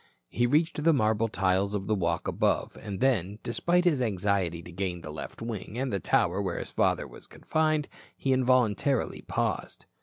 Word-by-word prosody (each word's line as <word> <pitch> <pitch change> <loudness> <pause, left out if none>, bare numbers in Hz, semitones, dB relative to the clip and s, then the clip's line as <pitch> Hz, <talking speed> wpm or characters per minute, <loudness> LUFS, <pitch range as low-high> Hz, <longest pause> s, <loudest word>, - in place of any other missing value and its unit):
He 120 +1 +1
reached 150 +3 +1
the 165 +1 +5
marble 110 -3 +2
tiles 100 -1 +1
of 95 -1 -2
the 110 - +1
walk 95 -5 0
above - - 0
and 100 -2 -6
then, 105 -7 +1
despite 175 +9 +1
his 155 -7 +3
anxiety 95 -6 0
to 90 - -10
gain 90 -1 -3
the 75 - -7
left 75 +8 -7
wing 110 -1 -5
and 130 -2 -2
the 100 - 0
tower 90 +2 +1
where 95 -3 -2
his - - -5
father - - +1
was - - -12
confined, 155 -2 0 0.3
he 135 - +1
involuntarily 130 0 +2
paused. - - -3
110 Hz, 180 wpm, -28 LUFS, 95-130 Hz, 0.3 s, the